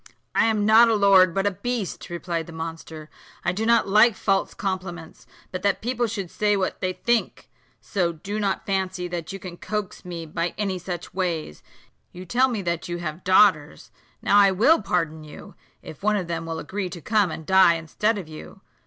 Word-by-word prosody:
"I - - +3
am 215 -2 +1
not 220 +2 +7
a 225 - +3
lord, 195 -3 +5
but 195 +3 -1
a 205 - +2
beast," 205 +1 -4
replied 170 -1 -4
the - - -9
monster; 160 -1 -7 0.4
"I 175 - +2
do 215 +5 -2
not 235 -2 +4
like 215 +3 +5
false 195 0 0
compliments, 185 -4 -5 0.2
but 185 - -4
that 200 -1 +1
people 240 0 -1
should 200 -5 -5
say 210 -1 +1
what 190 -1 -2
they 185 0 -1
think: 235 +4 -1 0.3
so 180 -4 -1
do 195 +6 -5
not 200 -2 -1
fancy 190 -2 -2
that 170 -2 -5
you 195 - -5
can 180 -2 -9
coax 210 -1 -5
me 170 -2 -6
by 165 +2 -3
any 195 -3 -2
such 175 0 -6
ways. 170 - -3 0.5
You 180 +1 -9
tell 250 +8 +3
me 225 -6 -3
that 170 -1 -3
you 175 - -3
have 170 0 -6
daughters; 185 -5 +3 0.3
now 205 - +5
I 200 -1 +6
will 220 - +4
pardon 165 -5 -2
you, 150 - -12 0.3
if 155 - -11
one 210 +1 +2
of 190 -3 -1
them 165 -1 -4
will 165 0 -4
agree 185 +5 -4
to 175 - -8
come 210 +2 +1
and 160 0 -7
die 190 -1 +5
instead 205 +7 -1
of 185 -5 -6
you. 155 +5 -11
185 Hz, 200 wpm, -24 LUFS, 170-205 Hz, 0.5 s, not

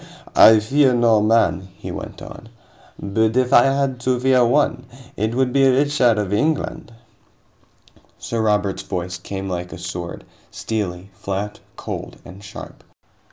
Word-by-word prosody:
"I 110 0 +8
fear 130 +4 +2
no 115 -3 +3
man," 110 -3 +2
he - - -7
went - - -8
on, 115 - -11 0.5
"but 110 +3 0
if 130 +1 +1
I 120 - +7
had 135 -1 0
to 125 0 0
fear 130 -1 +3
one, 125 0 +1 0.3
it 110 +3 -2
would 130 -1 0
be 135 -1 +4
Richard 130 -3 +2
of 100 -2 -2
England." 150 +1 -1 1.3
Sir 115 -1 -3
Robert's 105 -3 0
voice 95 -1 -5
came 95 +1 -6
like 90 -1 -5
a - - -8
sword: - - -7 0.2
steely, 100 -4 -5
flat, 100 +2 -5 0.2
cold, - - -7
and 95 +3 -12
sharp. 95 - -11
110 Hz, 145 wpm, -20 LUFS, 100-130 Hz, 1.3 s, I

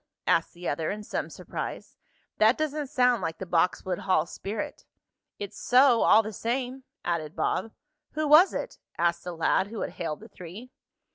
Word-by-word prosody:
asked - - +2
the 175 +1 -6
other, 155 +2 -1
in 210 +1 -4
some - - -3
surprise. - - -6 0.4
"That 220 +3 +5
doesn't 305 -1 -2
sound 250 -3 +3
like 165 -2 -3
the 190 - -6
Boxwood 180 +1 +1
Hall 185 -4 +2
spirit." 205 +4 -5 0.5
"It's 205 0 -7
so 250 -2 +5
all 220 - +6
the 215 0 -6
same," 255 +4 -3 0.2
added 165 -1 -2
Bob. 225 - -1 0.4
"Who 310 0 -1
was 310 +6 +8
it?" - - -5 0.2
asked 170 0 +1
the 180 - -3
lad 175 +4 +2
who 220 0 -6
had - - -3
hailed 155 0 -4
the 220 - -11
three. 195 +7 -10
210 Hz, 170 wpm, -27 LUFS, 175-250 Hz, 0.5 s, was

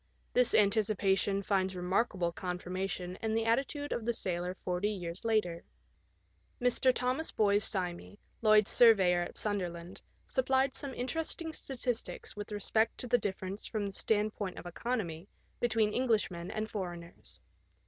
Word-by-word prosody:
This 250 -1 +4
anticipation 200 -2 +2
finds 190 -1 0
remarkable 180 0 0
confirmation 180 +1 -4
in 220 0 0
the 225 0 +1
attitude 275 +5 0
of 235 - -3
the 235 +1 0
sailor 180 -1 -1
forty 180 +3 -1
years 180 -2 -5
later. 210 -7 0 1.0
Mr. 250 +1 +4
Thomas 255 +5 -1
Boyes 205 0 +3
Simey, 180 0 -4 0.2
Lloyd's 215 -2 +5
surveyor 190 -7 +6
at 175 - -5
Sunderland, 180 -4 -2 0.2
supplied 265 +1 +1
some 275 -2 -6
interest 310 +6 -2
ing 320 -1 -5
statistics 250 -5 -3
with 205 +1 -6
respect 220 +2 +1
to - - -4
the 245 0 +3
difference 195 -1 -4
from 215 -3 -2
the 200 - -3
stand 215 0 +1
point 195 -3 -5
of - - -8
economy 175 -3 -3 0.3
between 220 -3 +2
Englishmen 210 -8 0
and 215 0 -3
foreigners. 175 -5 -7
205 Hz, 140 wpm, -32 LUFS, 180-230 Hz, 1.0 s, surveyor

